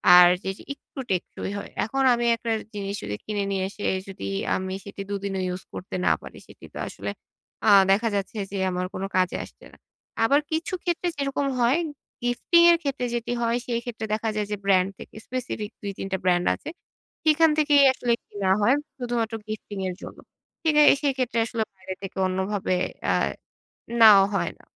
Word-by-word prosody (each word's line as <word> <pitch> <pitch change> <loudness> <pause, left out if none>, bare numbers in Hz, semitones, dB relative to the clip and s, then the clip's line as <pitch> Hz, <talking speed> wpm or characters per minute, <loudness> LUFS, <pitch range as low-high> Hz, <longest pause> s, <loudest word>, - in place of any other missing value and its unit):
আর 180 0 +10 0.2
যে 190 - -2
জি - - -13
একটু 280 - -13
টেকসই 185 +1 -3
হয়। - - -7 0.2
এখন 270 +4 -1
আমি 240 0 0
একটা 230 0 -4 0.2
জিনিস 200 -1 -4
যদি 105 0 -3
কিনে 205 -1 -1
নিয়ে 190 -1 0
এসে 205 - -7 0.2
যদি 190 - -7 0.3
আমি 190 0 -3
সেটি 200 0 -7
দুদিনও 200 -1 -2
ইউজ 180 +1 -4
করতে 185 - -6
না - - +5
পারি - - -11
সেটি - - -14
তো - - -8
আসলে - - -6 0.6
আ - - +7 0.2
দেখা 225 +4 +3
যাচ্ছে 200 +2 -3
যে 200 - -3
আমার 180 0 -2
কোন 190 - -4
কাজে 185 -1 +2
আসছে - - -15
না। - - -18 0.5
আবার 280 +6 +5
কিছু 320 +3 -2
ক্ষেত্রে 350 0 -1
যেরকম 275 0 -1
হয় 240 +6 +4 0.5
গিফটিং 245 +8 +3
এর 340 - +5
ক্ষেত্রে 275 -3 -1
যেটি 240 0 -2
হয় 235 +1 +1
সেইক্ষেত্রে 235 -2 -3
দেখা 220 +1 0
যায় 210 -1 -1
যে 210 - -1
ব্র্যান্ড 190 -1 +4
থেকে - - -12
স্পেসিফিক 240 -4 -4
২-৩ 200 -1 -5
টা 190 - +1
ব্র্যান্ড 180 -1 +2
আছে। - - -8 0.5
সেখান 320 +1 +5
থেকেই 290 -2 +5
আসলে 245 -2 -1 0.2
কেনা 195 -2 -2
হয় 245 +7 +5 0.2
শুধুমাত্র 240 -2 -2
গিফটিং 215 -1 -6
এর 180 - -5
জন্য। - - -9 0.5
কিনে 300 -2 +4 0.2
সেক্ষেত্রে 260 -4 0
আসলে 225 -1 -2
বাইরে 190 0 -7
থেকে 195 0 -7
অন্যভাবে 190 0 -1 0.4
আ - - +3 0.9
নেওয়া 205 -3 +9
হয় - - 0
না। - - -21
215 Hz, 180 wpm, -25 LUFS, 195-255 Hz, 0.9 s, আর